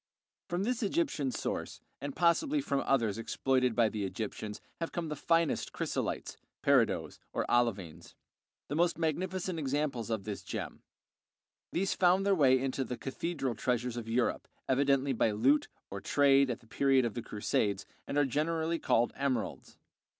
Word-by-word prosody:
From 175 Hz, +2 st, -1 dB
this 245 Hz, +2 st, -1 dB
Egyptian 205 Hz, -, 0 dB
source, -, -, -4 dB, 0.2 s
and 140 Hz, -1 st, -5 dB
possibly 180 Hz, -, +3 dB
from 140 Hz, -, 0 dB
others 115 Hz, -6 st, +2 dB
exploited 130 Hz, +1 st, +1 dB
by 115 Hz, -2 st, +4 dB
the 105 Hz, -1 st, -3 dB
Egyptians, 105 Hz, +1 st, -4 dB, 0.2 s
have 165 Hz, -, -3 dB
come 170 Hz, -2 st, -3 dB
the 150 Hz, -, -3 dB
finest 165 Hz, +2 st, +1 dB
chrysolites -, -, -3 dB, 0.3 s
(peridots, -, -, +2 dB
or -, -, 0 dB
olivines), 95 Hz, -9 st, 0 dB, 0.5 s
the -, -, -4 dB
most 170 Hz, +1 st, +2 dB
magnificent 175 Hz, +2 st, -1 dB
examples 140 Hz, -5 st, -1 dB
of 110 Hz, -3 st, -1 dB
this 105 Hz, -1 st, -5 dB
gem. -, -, -6 dB, 0.9 s
These 190 Hz, +2 st, 0 dB
found 185 Hz, +2 st, +3 dB
their 200 Hz, -, +4 dB
way 135 Hz, -7 st, +5 dB
into 135 Hz, 0 st, -1 dB
the 125 Hz, -1 st, -5 dB
cathedral 135 Hz, -1 st, -3 dB
treasures 120 Hz, +1 st, -1 dB
of 115 Hz, -2 st, -5 dB
Europe, 120 Hz, +1 st, 0 dB, 0.2 s
evidently 135 Hz, 0 st, +2 dB
by 115 Hz, -, +2 dB
loot 130 Hz, +8 st, +3 dB, 0.2 s
or 100 Hz, 0 st, -5 dB
trade 140 Hz, -1 st, +4 dB
at 120 Hz, -, -3 dB
the 115 Hz, -, -21 dB
period 135 Hz, +1 st, +3 dB
of 115 Hz, -, -2 dB
the 120 Hz, -, -4 dB
Crusades, 105 Hz, -2 st, -1 dB, 0.2 s
and 140 Hz, -, -2 dB
are 145 Hz, -, +4 dB
generally 160 Hz, +4 st, 0 dB
called 120 Hz, +1 st, +2 dB
emeralds. 135 Hz, -3 st, -2 dB
135 Hz, 155 wpm, -31 LUFS, 115-165 Hz, 0.9 s, way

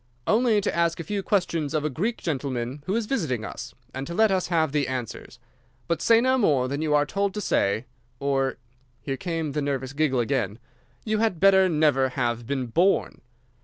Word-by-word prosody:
"'Only 220 Hz, -1 st, +3 dB
to -, -, -2 dB
ask 170 Hz, 0 st, +1 dB
a -, -, -3 dB
few 200 Hz, +5 st, -2 dB
questions 170 Hz, -7 st, 0 dB
of 150 Hz, -1 st, 0 dB
a -, -, +1 dB
Greek 215 Hz, -, -1 dB
gentleman 135 Hz, -3 st, -3 dB
who 190 Hz, -, 0 dB
is 230 Hz, -1 st, 0 dB
visiting 155 Hz, -, -1 dB
us, -, -, -8 dB, 0.2 s
and 135 Hz, +1 st, -5 dB
to 170 Hz, -, -5 dB
let 220 Hz, 0 st, +4 dB
us 185 Hz, -1 st, +1 dB
have 160 Hz, -4 st, +1 dB
the 145 Hz, -1 st, 0 dB
answers. 125 Hz, -3 st, -5 dB, 0.5 s
But 170 Hz, -2 st, -1 dB
say 230 Hz, -1 st, +5 dB
no 260 Hz, +2 st, +2 dB
more 140 Hz, -, +2 dB
than 140 Hz, +3 st, -3 dB
you 155 Hz, -2 st, +1 dB
are 145 Hz, 0 st, +3 dB
told 200 Hz, +6 st, -1 dB
to -, -, -2 dB
say, 110 Hz, -, +1 dB, 0.3 s
or'—here 135 Hz, -1 st, -3 dB
came 165 Hz, -3 st, -3 dB
the 150 Hz, +1 st, -2 dB
nervous 135 Hz, -2 st, -2 dB
giggle 145 Hz, -3 st, +1 dB
again—'you 120 Hz, -, -3 dB
had 220 Hz, -7 st, +1 dB
better 190 Hz, 0 st, +5 dB
never 150 Hz, -5 st, +3 dB
have 120 Hz, -3 st, -2 dB
been 135 Hz, -2 st, -1 dB
born. 170 Hz, +11 st, +1 dB
150 Hz, 190 wpm, -25 LUFS, 130-190 Hz, 0.5 s, say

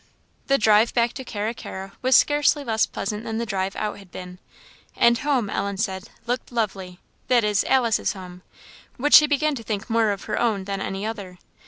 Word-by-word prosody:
The 275 Hz, -, +4 dB
drive 215 Hz, 0 st, +4 dB
back 235 Hz, 0 st, +2 dB
to 265 Hz, -, -7 dB
Carra 220 Hz, -2 st, -3 dB
carra 195 Hz, -4 st, -8 dB
was 255 Hz, +1 st, +3 dB
scarcely 290 Hz, 0 st, +3 dB
less 220 Hz, -4 st, +1 dB
pleasant 210 Hz, +2 st, -4 dB
than 225 Hz, -1 st, -4 dB
the 235 Hz, -, -2 dB
drive 195 Hz, -2 st, -2 dB
out 210 Hz, -1 st, -3 dB
had 195 Hz, -2 st, -15 dB
been; 180 Hz, 0 st, -9 dB, 0.6 s
and 235 Hz, -1 st, +4 dB
home, 275 Hz, -7 st, 0 dB
Ellen 200 Hz, -1 st, -3 dB
said, 190 Hz, 0 st, -3 dB, 0.2 s
looked 245 Hz, +1 st, -3 dB
lovely; 195 Hz, -6 st, -3 dB, 0.3 s
that 245 Hz, -3 st, +3 dB
is, 210 Hz, -1 st, +2 dB
Alice's 240 Hz, -4 st, +2 dB
home, 180 Hz, -2 st, -10 dB, 0.6 s
which 295 Hz, +4 st, 0 dB
she 300 Hz, -, +9 dB
began 300 Hz, +1 st, +1 dB
to 255 Hz, -, -5 dB
think 220 Hz, +1 st, -4 dB
more 220 Hz, -3 st, +2 dB
her -, -, -4 dB
own 220 Hz, -5 st, 0 dB
than 195 Hz, 0 st, -4 dB
any 195 Hz, +1 st, -4 dB
other. 200 Hz, -5 st, -6 dB
220 Hz, 190 wpm, -23 LUFS, 195-240 Hz, 0.6 s, she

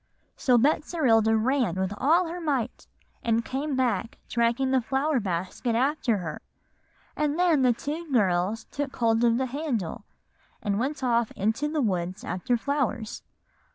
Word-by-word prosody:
"So 250 Hz, -2 st, +3 dB
Betserilda 235 Hz, -5 st, +3 dB
ran 245 Hz, -5 st, +1 dB
with 190 Hz, +1 st, -1 dB
all 330 Hz, -, +3 dB
her 350 Hz, +2 st, -5 dB
might, 280 Hz, -8 st, -2 dB, 0.3 s
and 230 Hz, 0 st, +1 dB
came 275 Hz, +2 st, -2 dB
back 250 Hz, -3 st, 0 dB
dragging 235 Hz, +3 st, +1 dB
the 260 Hz, -1 st, +3 dB
flower 270 Hz, +4 st, 0 dB
basket 190 Hz, +5 st, -2 dB
after 255 Hz, -2 st, +1 dB
her; 160 Hz, -5 st, -5 dB, 0.7 s
and 300 Hz, 0 st, 0 dB
then 345 Hz, -5 st, +3 dB
the 250 Hz, -1 st, +5 dB
two 300 Hz, +6 st, -5 dB
girls 200 Hz, -1 st, +1 dB
took 280 Hz, -1 st, -4 dB
hold 230 Hz, -1 st, +2 dB
of 235 Hz, -1 st, +4 dB
the 260 Hz, -, 0 dB
handle, 255 Hz, -, -3 dB, 0.6 s
and 205 Hz, -1 st, -1 dB
went 275 Hz, +3 st, -2 dB
off 235 Hz, -2 st, +2 dB
into 220 Hz, +9 st, 0 dB
the 300 Hz, 0 st, -1 dB
woods 185 Hz, -2 st, -2 dB
after 235 Hz, +7 st, -1 dB
flowers." 255 Hz, -4 st, -2 dB
245 Hz, 150 wpm, -26 LUFS, 220-285 Hz, 0.7 s, the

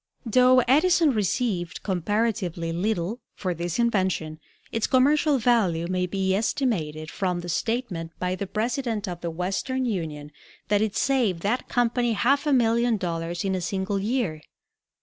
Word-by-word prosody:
Though 255 Hz, +2 st, +5 dB
Edison 310 Hz, +5 st, +4 dB
received 205 Hz, -5 st, -1 dB
comparatively 190 Hz, -2 st, -1 dB
little 190 Hz, +4 st, -1 dB, 0.2 s
for 185 Hz, -3 st, -2 dB
this 170 Hz, 0 st, -3 dB
invention, 190 Hz, -9 st, 0 dB, 0.3 s
its 225 Hz, -, 0 dB
commercial 285 Hz, +3 st, +3 dB
value 215 Hz, -9 st, +2 dB
may 180 Hz, +1 st, -1 dB
be 190 Hz, +1 st, 0 dB
estimated 175 Hz, -, -1 dB
from 180 Hz, -2 st, -1 dB
the 175 Hz, -, -7 dB
statement 210 Hz, -5 st, -2 dB
by 180 Hz, 0 st, -1 dB
the 195 Hz, +1 st, -4 dB
president 225 Hz, 0 st, -2 dB
of 175 Hz, -1 st, -5 dB
the 170 Hz, -, -3 dB
Western 195 Hz, +10 st, -2 dB
Union 155 Hz, -9 st, -4 dB, 0.4 s
that 205 Hz, 0 st, +3 dB
it 215 Hz, -2 st, -1 dB
saved 245 Hz, -10 st, +1 dB
that 220 Hz, +7 st, -1 dB
company 240 Hz, -1 st, +1 dB
half 275 Hz, +7 st, +2 dB
a -, -, +3 dB
million 235 Hz, -2 st, +3 dB
dollars 170 Hz, -1 st, -3 dB
in 190 Hz, -, 0 dB
a 185 Hz, -, -1 dB
single 195 Hz, +2 st, -2 dB
year. 205 Hz, -7 st, -1 dB
205 Hz, 150 wpm, -25 LUFS, 175-240 Hz, 0.4 s, Though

